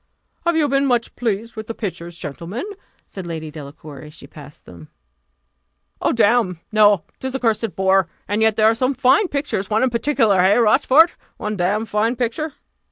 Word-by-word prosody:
"Have 340 Hz, -, +2 dB
you 305 Hz, -2 st, +2 dB
been 275 Hz, 0 st, +1 dB
much 240 Hz, -2 st, 0 dB
pleased 230 Hz, 0 st, -3 dB
with 220 Hz, -1 st, -7 dB
the 230 Hz, -, -5 dB
pictures, 175 Hz, -5 st, -6 dB
gentlemen?" 170 Hz, -, -6 dB, 0.4 s
said 190 Hz, -3 st, -9 dB
Lady 160 Hz, -2 st, -6 dB
Delacour, 145 Hz, -1 st, -10 dB
as 150 Hz, +1 st, -13 dB
she -, -, -13 dB
passed 150 Hz, -1 st, -14 dB
them. 85 Hz, -3 st, -13 dB, 1.1 s
"Oh, -, -, +2 dB
damme! 220 Hz, -5 st, +2 dB
no 210 Hz, -4 st, +4 dB, 0.2 s
'tis 260 Hz, 0 st, -4 dB
a -, -, -1 dB
cursed 225 Hz, -3 st, -1 dB
bore; 190 Hz, -1 st, +2 dB, 0.2 s
and 205 Hz, +2 st, -1 dB
yet 220 Hz, -1 st, +3 dB
there 215 Hz, -, +2 dB
are 220 Hz, -, +5 dB
some 255 Hz, +4 st, -1 dB
fine 270 Hz, -, +3 dB
pictures: 280 Hz, -, -3 dB
one 220 Hz, +3 st, +1 dB
in 260 Hz, -, +1 dB
particular 230 Hz, -6 st, +2 dB
hey, 190 Hz, +4 st, +4 dB
Rochfort? 260 Hz, +8 st, +5 dB, 0.3 s
one 210 Hz, 0 st, -4 dB
damned 205 Hz, +4 st, -1 dB
fine 220 Hz, +4 st, 0 dB
picture!" 255 Hz, +6 st, -3 dB
215 Hz, 180 wpm, -20 LUFS, 180-245 Hz, 1.1 s, are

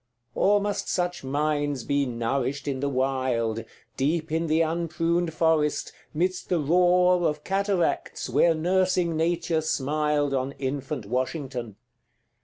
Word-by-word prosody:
Or 205 Hz, +2 st, +3 dB
must 205 Hz, 0 st, -2 dB
such 180 Hz, -2 st, -1 dB
minds 145 Hz, -1 st, -1 dB
be 140 Hz, +1 st, 0 dB
nourished 125 Hz, +4 st, -2 dB
in 135 Hz, -2 st, -1 dB
the 140 Hz, +1 st, -1 dB
wild, 130 Hz, -4 st, 0 dB, 0.3 s
Deep 155 Hz, +4 st, 0 dB
in 165 Hz, +1 st, 0 dB
the 160 Hz, +1 st, +2 dB
unpruned 165 Hz, +1 st, 0 dB
forest, 160 Hz, -2 st, +1 dB, 0.2 s
midst 180 Hz, +4 st, -1 dB
the 175 Hz, -, +2 dB
roar 180 Hz, +3 st, +4 dB
Of 150 Hz, 0 st, -3 dB
cataracts, 195 Hz, -2 st, -1 dB
where 150 Hz, +6 st, +3 dB
nursing 180 Hz, 0 st, +1 dB
nature 165 Hz, 0 st, 0 dB
smiled 150 Hz, -1 st, 0 dB
On 135 Hz, +1 st, -1 dB
infant 135 Hz, -2 st, -4 dB
Washington? 125 Hz, -1 st, -3 dB
155 Hz, 125 wpm, -26 LUFS, 135-170 Hz, 0.3 s, roar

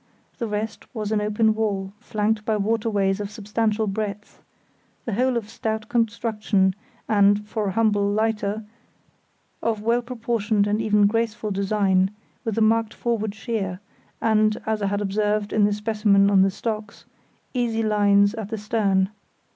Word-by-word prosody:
The 230 Hz, -, -1 dB
rest 215 Hz, +1 st, -4 dB
was 215 Hz, -1 st, -3 dB
an 215 Hz, -1 st, +1 dB
open 215 Hz, +1 st, +2 dB
well, 200 Hz, -3 st, -2 dB
flanked 215 Hz, -2 st, -1 dB
by 220 Hz, 0 st, 0 dB
waterways 205 Hz, -2 st, 0 dB
of 205 Hz, -1 st, -4 dB
substantial 215 Hz, +1 st, -1 dB
breadth; 205 Hz, 0 st, -5 dB, 0.6 s
the 230 Hz, -, -2 dB
whole 250 Hz, +3 st, +1 dB
of 220 Hz, -3 st, -4 dB
stout 220 Hz, 0 st, -4 dB
construction 215 Hz, -4 st, +1 dB, 0.3 s
and, 205 Hz, 0 st, +3 dB
for 215 Hz, -1 st, -2 dB
a -, -, 0 dB
humble 205 Hz, -2 st, +2 dB
lighter, 215 Hz, 0 st, 0 dB, 1.0 s
of 220 Hz, -2 st, -1 dB
well 235 Hz, +2 st, +2 dB
proportioned 230 Hz, -4 st, 0 dB
and 210 Hz, +1 st, 0 dB
even 210 Hz, -2 st, +3 dB
graceful 215 Hz, 0 st, 0 dB
design, 195 Hz, -1 st, +2 dB, 0.3 s
with 225 Hz, -2 st, -3 dB
a -, -, +2 dB
marked 225 Hz, 0 st, +2 dB
forward 220 Hz, -3 st, -2 dB
sheer, 205 Hz, -5 st, -3 dB, 0.4 s
and, 215 Hz, -1 st, +2 dB
as 220 Hz, -1 st, -1 dB
I 200 Hz, -, +1 dB
had 205 Hz, +1 st, -1 dB
observed 210 Hz, +1 st, 0 dB
in 210 Hz, -1 st, +4 dB
the 205 Hz, -, +2 dB
specimen 210 Hz, -1 st, +2 dB
on 195 Hz, -1 st, +5 dB
the 195 Hz, -, +4 dB
stocks, 210 Hz, +1 st, -5 dB, 0.5 s
easy 235 Hz, -3 st, 0 dB
lines 205 Hz, -1 st, +4 dB
at 220 Hz, -3 st, -5 dB
the 220 Hz, -, -3 dB
stern. 205 Hz, -3 st, +1 dB
210 Hz, 155 wpm, -23 LUFS, 205-225 Hz, 1.0 s, on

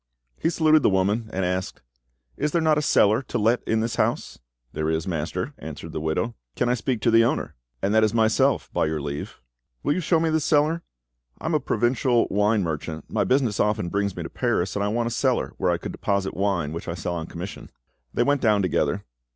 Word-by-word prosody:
He 165 Hz, -, +1 dB
saluted 155 Hz, -2 st, +4 dB
the -, -, +4 dB
woman, 100 Hz, +4 st, +1 dB
and 95 Hz, 0 st, -1 dB
asked— 90 Hz, +1 st, -3 dB, 0.5 s
"Is 150 Hz, -, 0 dB
there 170 Hz, -, +2 dB
not 155 Hz, -2 st, +3 dB
a -, -, -1 dB
cellar 110 Hz, -5 st, +4 dB
to 125 Hz, -, -4 dB
let 115 Hz, +3 st, +2 dB
in 110 Hz, 0 st, +2 dB
this 115 Hz, +1 st, -2 dB
house?" -, -, -1 dB, 0.3 s
"There 80 Hz, 0 st, -1 dB
is, 80 Hz, +1 st, -1 dB
master," 90 Hz, -, -3 dB
answered 80 Hz, +1 st, -8 dB
the 80 Hz, -, -4 dB
widow. 80 Hz, +9 st, -1 dB, 0.2 s
"Can 120 Hz, -, +1 dB
I -, -, +3 dB
speak 125 Hz, -1 st, -2 dB
to 115 Hz, -, +3 dB
the 115 Hz, 0 st, +6 dB
owner?" 115 Hz, -, -1 dB, 0.3 s
"And 100 Hz, +2 st, +1 dB
that 110 Hz, 0 st, +5 dB
is 110 Hz, -, +3 dB
myself, 110 Hz, -1 st, +2 dB
by -, -, +1 dB
your 80 Hz, 0 st, -2 dB
leave." 70 Hz, 0 st, -5 dB, 0.4 s
"Will 145 Hz, -, +2 dB
you -, -, -1 dB
show 165 Hz, -1 st, +2 dB
me 160 Hz, 0 st, +1 dB
the 160 Hz, -, +2 dB
cellar? 155 Hz, +2 st, +2 dB, 0.6 s
I -, -, -9 dB
am -, -, 0 dB
a -, -, +3 dB
provincial 120 Hz, +1 st, +2 dB
wine 105 Hz, +1 st, +2 dB
merchant, 80 Hz, -1 st, -5 dB
my -, -, +1 dB
business 125 Hz, -6 st, +1 dB
often 105 Hz, -4 st, +1 dB
brings 100 Hz, +1 st, -1 dB
me -, -, -4 dB
to -, -, -6 dB
Paris, 90 Hz, +2 st, 0 dB
and 100 Hz, -, 0 dB
I -, -, +1 dB
want 115 Hz, +3 st, 0 dB
a 115 Hz, -, -2 dB
cellar 130 Hz, +1 st, 0 dB
where 95 Hz, -, +1 dB
I 85 Hz, -, +2 dB
could -, -, -6 dB
deposit 100 Hz, -1 st, -1 dB
wine 95 Hz, -6 st, 0 dB
which 85 Hz, -, -6 dB
I 85 Hz, -, -3 dB
sell 85 Hz, 0 st, -3 dB
on 80 Hz, -1 st, -4 dB
commission." 90 Hz, +4 st, -7 dB, 0.4 s
They -, -, +1 dB
went 140 Hz, +2 st, +1 dB
down 105 Hz, -3 st, +3 dB
together. 90 Hz, -, 0 dB
105 Hz, 225 wpm, -24 LUFS, 90-125 Hz, 0.6 s, the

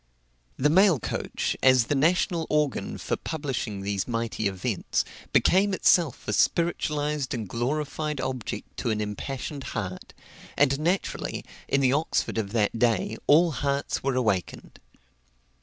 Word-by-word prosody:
The 150 Hz, +3 st, +3 dB
mail 185 Hz, -3 st, +5 dB
coach, -, -, -2 dB
as 130 Hz, -3 st, +5 dB
the 145 Hz, -, -1 dB
national 165 Hz, +3 st, +2 dB
organ 150 Hz, -3 st, 0 dB
for -, -, -2 dB
publishing 130 Hz, -9 st, -4 dB
these 100 Hz, 0 st, -2 dB
mighty 115 Hz, -2 st, -1 dB
events, 95 Hz, -2 st, -1 dB, 0.3 s
became 195 Hz, +1 st, +3 dB
itself 170 Hz, -7 st, +2 dB
a 105 Hz, -, 0 dB
spiritualized 150 Hz, -3 st, 0 dB
and 110 Hz, -4 st, -4 dB
glorified 150 Hz, +6 st, -2 dB
object 130 Hz, -4 st, -5 dB
to 120 Hz, -, -2 dB
an 110 Hz, -1 st, 0 dB
impassioned 130 Hz, +7 st, -4 dB
heart; 95 Hz, -4 st, -5 dB, 0.4 s
and 140 Hz, 0 st, +3 dB
naturally, 175 Hz, +5 st, -2 dB, 0.2 s
in 140 Hz, -, +2 dB
the 130 Hz, -1 st, +3 dB
Oxford 150 Hz, -5 st, 0 dB
of 100 Hz, -3 st, -3 dB
that 110 Hz, 0 st, +1 dB
day, 115 Hz, -2 st, +1 dB
all 165 Hz, +3 st, +6 dB
hearts 140 Hz, -1 st, -1 dB
were 135 Hz, -1 st, 0 dB
awakened. 105 Hz, -8 st, -2 dB
135 Hz, 135 wpm, -26 LUFS, 115-150 Hz, 0.4 s, all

